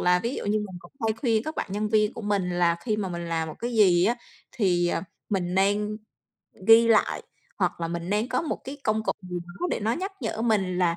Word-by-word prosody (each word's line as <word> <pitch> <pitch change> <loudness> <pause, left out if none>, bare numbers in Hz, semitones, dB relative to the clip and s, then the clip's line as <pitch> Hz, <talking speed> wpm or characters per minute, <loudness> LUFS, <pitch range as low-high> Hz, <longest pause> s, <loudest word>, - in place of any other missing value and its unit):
là 180 0 +4
ví 240 +4 -1
dụ - - -4
như 215 +1 +2
mình 195 -4 -5
cũng - - -16
hay 220 - +2
khuyên 225 -1 +1
các 310 +3 -5
bạn - - -1
nhân 210 +1 -1
viên 215 -1 +3
của - - -8
mình 200 -3 0
là 175 -1 +2
khi 215 -3 -1
mà 200 -3 -2
mình 170 -1 -5
làm 160 -1 -1
một 155 - -7
cái 240 +1 -3
gì 180 -5 +5
á, 235 +4 +3 0.4
thì 175 -6 +2
à, 170 - -1 0.3
mình 180 -3 -1
nên 205 +2 +2 0.7
ghi 230 +1 +9
lại 220 -2 +3 0.4
hoặc 180 -2 0
là 165 - -1
mình 170 +1 -4
nên 210 +4 +1
có 255 - 0
một 315 - -2
cái 275 +2 -6
công 215 0 +1
cụ - - +1
gì 180 -1 -5
đó 175 - -4
để - - -1
nó 220 +2 +1
nhắc 380 +7 -3
nhở 225 -1 -2
mình, 195 -6 +1
là 170 -2 +2
205 Hz, 250 wpm, -26 LUFS, 180-220 Hz, 0.7 s, ghi